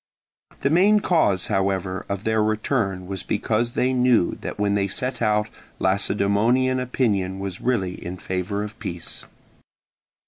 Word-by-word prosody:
The 140 - +1
main 200 +6 +5
cause 105 - +2
however 95 -1 -1
of 100 0 -3
their 110 0 +1
return 105 -3 0
was 95 -1 -4
because 115 +3 -1
they 130 +1 +1
knew 125 -7 +3
that - - -5
when 100 0 +1
they 100 -1 +1
set 125 +7 -3
out 105 -1 +2 0.3
Lacedaemonian 105 +6 +2
opinion 105 -7 0
was 95 -1 -5
really 100 -8 -1
in 90 +1 -5
favour 95 +3 -3
of 105 +2 -8
peace. 85 -1 -6
105 Hz, 140 wpm, -23 LUFS, 95-120 Hz, 0.3 s, main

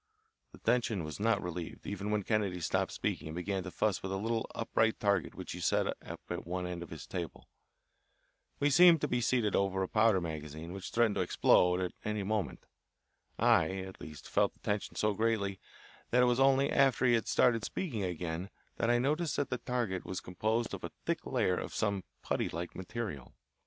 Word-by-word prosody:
The - - -13
tension 115 -6 +1
was 75 +3 -6
not 110 0 +2
relieved 90 -1 -6
even 100 0 -4
when 105 -1 +1
Kennedy 100 -4 0
stopped 85 - 0
speaking - - -2
and 80 - -6
began 95 +2 -2
to 95 - -6
fuss 105 +2 0
with 95 - -4
a 95 - -1
little 115 +3 -1
upright 110 -1 +1
target 100 -4 +1
which - - -7
he - - -5
set - - +2
up - - -6
at - - -5
one 90 +1 -2
end 90 -1 -4
of 85 - -7
his - - -8
table. - - -6 1.1
We 145 0 +3
seemed 175 +2 +8
to - - +1
be 125 0 0
seated 115 -3 +2
over 95 -1 +1
a - - -1
powder 110 -2 +4
magazine 80 0 -6
which 95 0 -6
threatened 115 -3 +3
to - - +2
explode 90 0 +4
at 90 - -1
any 105 -1 -2
moment. 105 +1 -2 0.7
I, 115 -8 +4
at 95 0 -7
least, 75 -2 -9
felt - - +2
the - - -28
tension 105 0 -2
so 105 0 +1
greatly 100 -3 0 0.5
that 125 +1 +4
it - - +6
was 125 0 +2
only 135 +1 +4
after 135 -1 +4
he 120 - +5
had 115 -2 +1
started 115 -3 +3
speaking 125 - -3
again, 90 0 -3 0.3
that 115 - +1
I 120 - +5
noticed 150 +6 0
that 145 - -1
the 125 - -1
target 120 -7 -2
was 95 - -4
composed 110 +6 -1
of - - -6
a - - -3 0.2
thick - - -1
layer 90 - +1
of - - -6
some 100 -3 0 0.2
putty - - 0
like 85 +1 -5
material. 95 - -5
105 Hz, 205 wpm, -32 LUFS, 90-115 Hz, 1.1 s, seemed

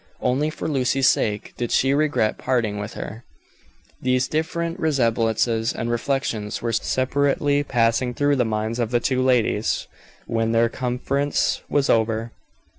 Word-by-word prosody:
Only 145 +5 +1
for 155 - -5
Lucy's 135 -2 +2
sake 105 -1 0
did 120 -2 -3
she 135 +1 +3
regret 145 -7 +1
parting 115 -5 0
with 105 +1 -6
her. 110 +3 -7 0.8
These 130 0 +1
different 170 +2 -2
resemblances 115 -5 +1
and 115 +1 -3
reflections 120 -4 -2
were 115 -1 -2
separately 140 +4 +1
passing 120 -1 +1
through 145 +1 +2
the 125 - +3
minds 110 +1 -2
of 115 -2 0
the 120 0 +2
two 130 +1 0
ladies 120 -4 +1 0.4
when 115 0 0
their 115 0 +3
conference 130 +4 -1
was 140 -1 +2
over. 115 0 +1
125 Hz, 140 wpm, -23 LUFS, 115-140 Hz, 0.8 s, she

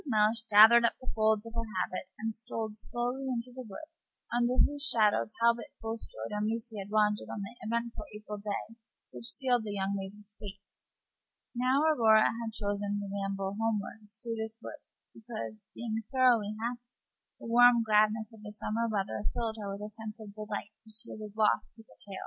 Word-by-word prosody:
Mellish 220 0 +2
gathered 220 +3 +9
up 235 - +2
the 255 - -4
folds 220 0 +2
of 230 - -9
her 230 -1 -3
habit 185 0 -2
and 225 0 -2
strolled 225 -1 -4
slowly 245 +4 -3
into 245 0 -3
the 255 - -7
wood 310 +11 -8 0.5
under 240 +1 +2
whose 290 +1 +3
shadow 215 -4 +4
Talbot 235 0 +3
Bulstrode 225 - -5
and 210 +1 0
Lucy 225 -1 -3
had 195 - -8
wandered 210 -1 +2
on 205 - -4
that 235 +5 -11
eventful 235 +1 -2
April 210 0 -7
day 210 +2 -4 0.4
which - - -7
sealed 250 -3 +2
the 210 -1 -4
young 195 +1 0
lady's 205 +2 -6
fate. 200 -1 -7 0.9
Now, 255 +4 +2
Aurora 225 -8 +5
had 225 -1 -4
chosen 205 0 -1
to 205 - -3
ramble 195 -1 -2
homeward 215 -1 -2
through 230 +2 -4
this 220 0 -4
wood - - -8 0.3
because, 115 - -7
being 225 -1 -2
thoroughly 245 -6 +3
happy, 240 +1 -3 0.6
the - - -10
warm 245 -1 +7
gladness 215 0 +3
of 220 - -14
the 210 -1 -8
summer 220 +2 -1
weather 205 0 -2
filled 225 -2 -2
her 200 - -4
with 200 +1 -5
a 210 - -9
sense 220 0 -7
of 210 -2 -10
delight 210 0 -5
which 220 -1 -9
she - - -4
was 215 -1 -7
loath 215 -1 +4 0.2
to 225 - -13
curtail. 195 -3 -10
220 Hz, 185 wpm, -31 LUFS, 210-235 Hz, 0.9 s, gathered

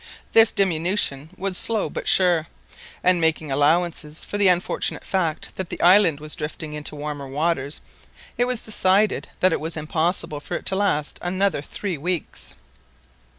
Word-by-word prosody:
This 225 -1 +7
diminution 170 -5 +1
was 190 -1 -1
slow 225 -3 0
but - - -6
sure, 175 -4 +4 0.6
and, 180 -1 +4
making 160 -2 0
allowance 155 +2 +1
for 205 - -4
the 200 - +5
unfortunate 180 0 0
fact 170 -5 -2
that 190 -2 -4
the - - -6
island 175 -4 +5
was 150 0 -3
drifting 150 0 -6
into 150 0 -5
warmer 145 -1 -5
waters, 145 0 -1 0.5
it 245 - +2
was 250 -2 0
decided 205 -1 +2
that 185 -2 +4
it - - -1
was 160 +2 -3
impossible 155 0 -1
for - - -6
it - - -5
to 190 - +1
last 190 -7 0
another 185 -2 0
three 180 +2 -5
weeks. 175 +1 -4
170 Hz, 155 wpm, -23 LUFS, 150-190 Hz, 0.6 s, This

